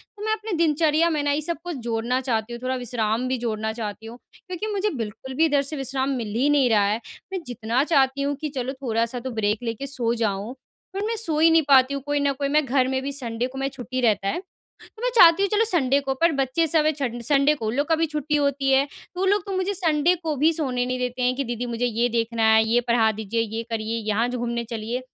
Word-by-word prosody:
तो 415 Hz, -, -9 dB
मैं 435 Hz, -, +1 dB
अपने 435 Hz, 0 st, -5 dB
दिनचर्या 315 Hz, 0 st, +3 dB
में 310 Hz, -3 st, 0 dB
ना 290 Hz, -, +1 dB
ये 290 Hz, +2 st, 0 dB
सब 335 Hz, +1 st, -2 dB
कुछ 350 Hz, -2 st, -4 dB
जोड़ना 235 Hz, +2 st, 0 dB
चाहती 235 Hz, -3 st, -2 dB
हूँ। 235 Hz, -, -7 dB
थोड़ा 260 Hz, 0 st, -1 dB
विश्राम 240 Hz, -1 st, -1 dB
भी 260 Hz, 0 st, 0 dB
जोड़ना 220 Hz, -2 st, -2 dB
चाहती 220 Hz, -1 st, -6 dB
हूँ 230 Hz, +2 st, -9 dB, 0.2 s
क्योंकि 370 Hz, +3 st, -6 dB
मुझे 405 Hz, +1 st, 0 dB
बिल्कुल 225 Hz, +4 st, -6 dB
भी 320 Hz, +4 st, +4 dB
इधर 290 Hz, -3 st, +2 dB
से 280 Hz, +3 st, -4 dB
विश्राम 270 Hz, 0 st, -2 dB
मिल 230 Hz, -3 st, -4 dB
ही 265 Hz, +5 st, +2 dB
नहीं 285 Hz, -4 st, +3 dB
रहा 210 Hz, -3 st, +4 dB
है। 210 Hz, +3 st, 0 dB, 0.3 s
मैं 380 Hz, -, -1 dB
जितना 240 Hz, +1 st, 0 dB
चाहती 275 Hz, -3 st, +2 dB
हूँ 285 Hz, +1 st, 0 dB
कि 305 Hz, -, -2 dB
चलो 255 Hz, +1 st, -2 dB
थोड़ा-सा 230 Hz, -1 st, -1 dB
तो 260 Hz, +2 st, -5 dB
ब्रेक 215 Hz, 0 st, -1 dB
लेके 230 Hz, +4 st, -4 dB
सो 245 Hz, -4 st, -1 dB
जाऊँ 215 Hz, 0 st, -2 dB, 0.4 s
पर 395 Hz, +2 st, -2 dB
मैं 455 Hz, +1 st, -1 dB
सो 325 Hz, -9 st, -1 dB
ही 325 Hz, +1 st, +6 dB
नहीं 325 Hz, 0 st, +5 dB
पाती 270 Hz, -1 st, +5 dB
हूँ। 280 Hz, -, -3 dB
कोई 290 Hz, 0 st, 0 dB
न 285 Hz, -1 st, +1 dB
कोई 280 Hz, +1 st, -2 dB
मैं 300 Hz, +1 st, +2 dB
घर 260 Hz, 0 st, +2 dB
में 260 Hz, 0 st, -1 dB
भी 280 Hz, -, -3 dB
संडे 245 Hz, -3 st, -3 dB
को 265 Hz, +1 st, -11 dB
मैं 270 Hz, 0 st, -1 dB
छुट्टी 255 Hz, -1 st, -5 dB
रहता 210 Hz, -5 st, +2 dB
है 200 Hz, -, -1 dB, 0.4 s
तो 440 Hz, -, -16 dB
मैं -, -, +2 dB
चाहती 345 Hz, -2 st, +7 dB
हूँ 400 Hz, -, +1 dB
चलो 430 Hz, +3 st, +2 dB
संडे 280 Hz, -, +2 dB
को 270 Hz, -1 st, -2 dB
पर 335 Hz, 0 st, +5 dB
बच्चे 270 Hz, +6 st, +1 dB
सब 310 Hz, 0 st, +2 dB
है 310 Hz, -, +4 dB
छंड 250 Hz, -5 st, -4 dB
संडे 280 Hz, +3 st, +3 dB
को 225 Hz, -7 st, -4 dB
उन 220 Hz, -, -1 dB
लोग 285 Hz, +2 st, 0 dB
का 325 Hz, -, +4 dB
भी 325 Hz, +1 st, +1 dB
छुट्टी 300 Hz, -1 st, -2 dB
होती 280 Hz, -2 st, +1 dB
है। 270 Hz, +1 st, +4 dB
तो 325 Hz, +5 st, -13 dB
वो -, -, +2 dB
लोग 400 Hz, -1 st, +2 dB
तो 395 Hz, -, -4 dB
मुझे 375 Hz, +2 st, -1 dB
संडे 335 Hz, -2 st, +2 dB
को 315 Hz, -2 st, -1 dB
भी 315 Hz, +4 st, +3 dB
सोने 255 Hz, -6 st, -1 dB
नहीं 255 Hz, 0 st, -2 dB
देते 250 Hz, 0 st, -3 dB
हैं 250 Hz, 0 st, +2 dB
कि 275 Hz, -, -1 dB
दीदी 240 Hz, -1 st, -4 dB
मुझे 240 Hz, 0 st, -2 dB
ये 240 Hz, 0 st, +1 dB
देखना 230 Hz, -1 st, -1 dB
है, 220 Hz, 0 st, +6 dB
ये 240 Hz, +2 st, +3 dB
पढ़ा 230 Hz, -2 st, +3 dB
दीजिए, 220 Hz, +1 st, -2 dB
ये 225 Hz, +1 st, -3 dB
करिए, 225 Hz, 0 st, -2 dB
यहाँ 220 Hz, +3 st, +1 dB
जो 250 Hz, 0 st, -3 dB
घूमने 235 Hz, 0 st, -2 dB
चलिए। 230 Hz, +2 st, -4 dB
260 Hz, 260 wpm, -24 LUFS, 235-300 Hz, 0.4 s, चाहती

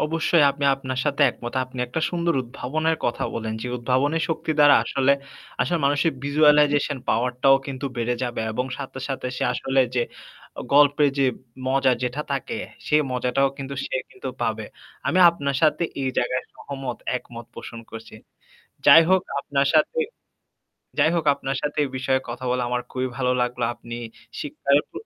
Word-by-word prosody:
অবশ্যই। 165 Hz, +1 st, +2 dB
আমি 140 Hz, +1 st, -4 dB
আপনার 130 Hz, -1 st, -5 dB
সাথে 145 Hz, 0 st, +1 dB
একমত। 120 Hz, 0 st, -8 dB
আপনি 130 Hz, 0 st, -11 dB
একটা 125 Hz, +6 st, -3 dB
সুন্দর 170 Hz, -2 st, 0 dB
উদ্ভাবনের 155 Hz, +6 st, -2 dB
কথা 120 Hz, -, -1 dB
বললেন। 110 Hz, -1 st, -3 dB
যে -, -, -4 dB
উদ্ভাবনের 130 Hz, +6 st, +1 dB
শক্তি 160 Hz, -1 st, -2 dB
দ্বারা 145 Hz, -1 st, +8 dB
আসলে 135 Hz, 0 st, +2 dB, 0.5 s
আসলে 175 Hz, -, +1 dB
মানুষের 145 Hz, +3 st, +2 dB
visualization 145 Hz, 0 st, +4 dB
power 125 Hz, +2 st, +2 dB
টাও 135 Hz, 0 st, +7 dB
কিন্তু 140 Hz, 0 st, -4 dB
বেড়ে 120 Hz, +1 st, 0 dB
যাবে 120 Hz, -2 st, -2 dB
এবং 125 Hz, +3 st, -2 dB
সাথে, 135 Hz, -1 st, -7 dB
সাথে 135 Hz, -2 st, -3 dB
সে -, -, -3 dB
আসলে 135 Hz, +2 st, +1 dB
যে 125 Hz, -, +2 dB, 0.6 s
আ -, -, -3 dB
গল্পের 145 Hz, 0 st, +5 dB
যে -, -, +4 dB, 0.4 s
মজা 135 Hz, 0 st, +3 dB
যেটা 125 Hz, +3 st, -2 dB
থাকে 135 Hz, -2 st, -3 dB, 0.3 s
সেই 150 Hz, -, +4 dB
মজাটাও 125 Hz, +2 st, +1 dB
কিন্তু 140 Hz, 0 st, -5 dB
সে -, -, -5 dB, 0.2 s
কিন্তু 390 Hz, -, -7 dB
পাবে। -, -, -1 dB, 0.4 s
আমি -, -, +2 dB
আপনার 140 Hz, -5 st, -2 dB
সাথে 155 Hz, +2 st, +3 dB, 0.2 s
এই 135 Hz, -, 0 dB
জায়গায় 130 Hz, +1 st, 0 dB
সহমত 135 Hz, -3 st, -6 dB, 0.2 s
একমত 120 Hz, -2 st, -10 dB
পোষণ 115 Hz, 0 st, -8 dB
করছি। 115 Hz, 0 st, -10 dB, 0.7 s
যাই 165 Hz, -, +10 dB
হোক 190 Hz, 0 st, +5 dB, 0.2 s
আপনার 140 Hz, -1 st, 0 dB
সাথে 380 Hz, +11 st, +3 dB, 1.0 s
যাই -, -, +5 dB
হোক 165 Hz, -2 st, -1 dB
আপনার 135 Hz, -1 st, -4 dB
সাথে 150 Hz, -1 st, -3 dB
এই 140 Hz, -, -3 dB
বিষয়ে 130 Hz, 0 st, +1 dB
কথা 120 Hz, +2 st, -6 dB
বলা 125 Hz, 0 st, 0 dB
আমার 125 Hz, 0 st, 0 dB
খুবই 130 Hz, 0 st, -2 dB
ভালো 125 Hz, -1 st, +1 dB
লাগলো। 125 Hz, 0 st, -1 dB
আপনি 120 Hz, 0 st, -9 dB, 0.5 s
শিক্ষার 140 Hz, -1 st, +1 dB
প -, -, -49 dB
135 Hz, 170 wpm, -23 LUFS, 125-150 Hz, 1.0 s, যাই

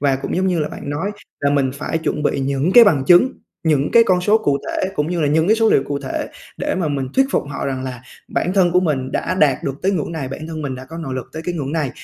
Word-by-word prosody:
và 135 Hz, -2 st, +2 dB
cũng 135 Hz, -, -4 dB
giống 190 Hz, +1 st, +1 dB
như 180 Hz, -3 st, +1 dB
là 150 Hz, -, -1 dB
bạn 140 Hz, -, -7 dB
nói 165 Hz, +8 st, -2 dB, 0.3 s
là 140 Hz, -, +2 dB
mình 140 Hz, -2 st, +2 dB
phải 160 Hz, +3 st, -3 dB
chuẩn 150 Hz, -2 st, -2 dB
bị 140 Hz, -, 0 dB
những 140 Hz, +6 st, 0 dB
cái 240 Hz, -1 st, +10 dB
bằng 145 Hz, -10 st, +3 dB
chứng, 180 Hz, -, +5 dB, 0.3 s
những 150 Hz, -3 st, +2 dB
cái 230 Hz, -1 st, +7 dB
con 180 Hz, -1 st, +3 dB
số 210 Hz, +4 st, +3 dB
cụ 145 Hz, -10 st, 0 dB
thể, 190 Hz, -, -1 dB
cũng 150 Hz, -1 st, -1 dB
như 175 Hz, -2 st, -1 dB
là 150 Hz, -, +2 dB
những 160 Hz, +3 st, +2 dB
cái 220 Hz, +2 st, +4 dB
số 225 Hz, -1 st, +3 dB
liệu 135 Hz, -, +4 dB
cụ 140 Hz, -1 st, -2 dB
thể 135 Hz, -2 st, -4 dB, 0.3 s
để -, -, -2 dB
mà 175 Hz, -4 st, -1 dB
mình 135 Hz, -3 st, -2 dB
thuyết 270 Hz, -, +4 dB
phục -, -, +1 dB
họ 140 Hz, -, -4 dB
rằng 130 Hz, -1 st, -3 dB
là 125 Hz, -1 st, -6 dB, 0.3 s
bản 180 Hz, -, -1 dB
thân 180 Hz, -3 st, +3 dB
của 180 Hz, -, +4 dB
mình 135 Hz, -6 st, -1 dB
đã 185 Hz, -, -1 dB
đạt 150 Hz, -7 st, +2 dB
được 135 Hz, -, -2 dB
tới 195 Hz, +2 st, +2 dB
ngưỡng 170 Hz, -1 st, -2 dB
này, 140 Hz, -5 st, -4 dB
bản 155 Hz, +4 st, -7 dB
thân 160 Hz, -2 st, -6 dB
mình 135 Hz, -2 st, -3 dB
đã 130 Hz, +1 st, -8 dB
có 165 Hz, +4 st, -9 dB
nội 135 Hz, -6 st, -5 dB
lực 130 Hz, -, -5 dB
tới 160 Hz, +1 st, -6 dB
cái 175 Hz, -, -2 dB
ngưỡng 145 Hz, -2 st, -3 dB
này 150 Hz, -6 st, -1 dB
150 Hz, 300 wpm, -19 LUFS, 135-180 Hz, 0.3 s, cái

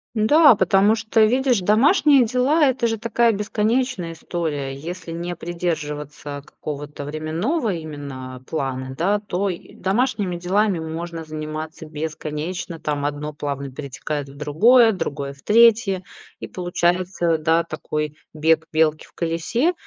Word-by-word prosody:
Да, 265 Hz, +5 st, +6 dB
потому 195 Hz, +3 st, +4 dB
что, 220 Hz, 0 st, +3 dB
видишь, 250 Hz, 0 st, +2 dB
домашние 265 Hz, -, +5 dB
дела- 255 Hz, +7 st, +2 dB
это 240 Hz, -2 st, 0 dB
же 225 Hz, 0 st, -1 dB
такая 230 Hz, +1 st, +2 dB
бесконечная 210 Hz, -2 st, -1 dB
история. 155 Hz, -5 st, -3 dB
Если 165 Hz, +4 st, -7 dB
не 175 Hz, +1 st, -4 dB
придерживаться 150 Hz, -4 st, -4 dB
какого-то 145 Hz, -1 st, -7 dB
временного 170 Hz, -, -1 dB
именно 140 Hz, -5 st, -7 dB
плана, 130 Hz, -3 st, -3 dB
да, 200 Hz, +5 st, +2 dB
то 200 Hz, -1 st, -2 dB
и 175 Hz, -, -8 dB
домашними 200 Hz, -3 st, 0 dB
делами 190 Hz, +1 st, +1 dB
можно 165 Hz, +1 st, -5 dB
заниматься 155 Hz, +1 st, -6 dB
бесконечно. 155 Hz, +2 st, -5 dB
Там 145 Hz, -1 st, -2 dB
одно 145 Hz, +1 st, -3 dB
плавно 140 Hz, -1 st, -4 dB
перетекает 140 Hz, +1 st, -5 dB
в 140 Hz, -, -13 dB
другое, 225 Hz, -, +5 dB
другое 140 Hz, -6 st, -4 dB
в 140 Hz, -, -20 dB
третье. 215 Hz, -4 st, +5 dB, 0.4 s
И -, -, -6 dB
получается, 175 Hz, -1 st, 0 dB
да, 165 Hz, +1 st, +2 dB
такой 150 Hz, -1 st, -4 dB, 0.2 s
бег 160 Hz, +1 st, +2 dB
белки 155 Hz, -1 st, +2 dB
в -, -, -22 dB
колесе, 175 Hz, -, 0 dB
170 Hz, 130 wpm, -22 LUFS, 150-215 Hz, 0.4 s, Да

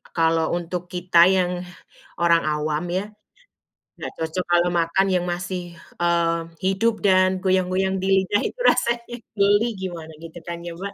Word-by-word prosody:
kalau 165 Hz, 0 st, +2 dB
untuk 175 Hz, +1 st, -4 dB
kita 175 Hz, -1 st, +4 dB
yang 180 Hz, -1 st, +1 dB, 0.6 s
orang 170 Hz, -1 st, +4 dB
awam 150 Hz, +2 st, -1 dB
ya, 195 Hz, +4 st, -3 dB, 0.9 s
nggak -, -, -5 dB
cocok 160 Hz, +3 st, -3 dB
kalau 175 Hz, 0 st, +3 dB
makan 170 Hz, +3 st, +1 dB
yang 180 Hz, -1 st, +1 dB
masih, 175 Hz, -1 st, -5 dB, 0.2 s
eee, 170 Hz, -1 st, +1 dB, 0.2 s
hidup 215 Hz, +3 st, 0 dB
dan 185 Hz, -1 st, +4 dB
goyang-goyang 190 Hz, 0 st, +1 dB
di 190 Hz, -, -2 dB, 0.2 s
lidah, 205 Hz, +2 st, +1 dB
itu -, -, -17 dB
rasanya 235 Hz, 0 st, +1 dB, 0.2 s
geli 205 Hz, +3 st, +3 dB
gimana, 175 Hz, -4 st, -6 dB
gitu 165 Hz, +1 st, -10 dB
kan, 170 Hz, +1 st, -6 dB
ya, 170 Hz, -, -5 dB
Mbak. 195 Hz, +4 st, -7 dB
180 Hz, 150 wpm, -22 LUFS, 170-190 Hz, 0.9 s, kita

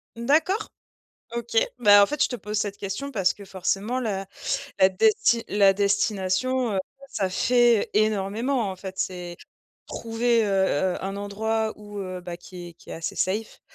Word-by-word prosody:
D'accord, 310 Hz, -, +1 dB, 0.7 s
OK. 235 Hz, -1 st, -5 dB, 0.2 s
Bah, 205 Hz, -3 st, +7 dB
en 200 Hz, -, +5 dB
fait, 295 Hz, -1 st, -1 dB
je -, -, 0 dB
te 245 Hz, -, -5 dB
pose 210 Hz, -2 st, -5 dB
cette 205 Hz, -1 st, -2 dB
question 205 Hz, +9 st, -5 dB
parce 190 Hz, -4 st, +2 dB
que, 200 Hz, -, -12 dB
forcément, 195 Hz, +6 st, -2 dB
la 195 Hz, -5 st, -2 dB, 0.5 s
la 190 Hz, -, +6 dB
desti 420 Hz, -, +3 dB
la 200 Hz, -1 st, +5 dB
destination, 205 Hz, +4 st, 0 dB
heu, 190 Hz, -, +1 dB, 0.3 s
ça 195 Hz, -7 st, -1 dB
fait, 240 Hz, +3 st, +3 dB
énormément, 215 Hz, +3 st, +1 dB
en 185 Hz, -, -7 dB
fait. 190 Hz, 0 st, -8 dB
C'est 180 Hz, -2 st, -4 dB, 0.5 s
trouver, 230 Hz, 0 st, 0 dB
heu -, -, -1 dB, 0.5 s
heu, -, -, -6 dB
un 195 Hz, +1 st, -3 dB
endroit 220 Hz, +2 st, -1 dB
où, 205 Hz, -1 st, -9 dB
heu, 185 Hz, -2 st, -5 dB
bah, 175 Hz, -1 st, -7 dB
qui 175 Hz, 0 st, -10 dB
est -, -, -12 dB
qui -, -, -16 dB
est -, -, -5 dB
assez 165 Hz, 0 st, -5 dB
safe. 210 Hz, +4 st, -2 dB
205 Hz, 170 wpm, -25 LUFS, 190-235 Hz, 0.7 s, Bah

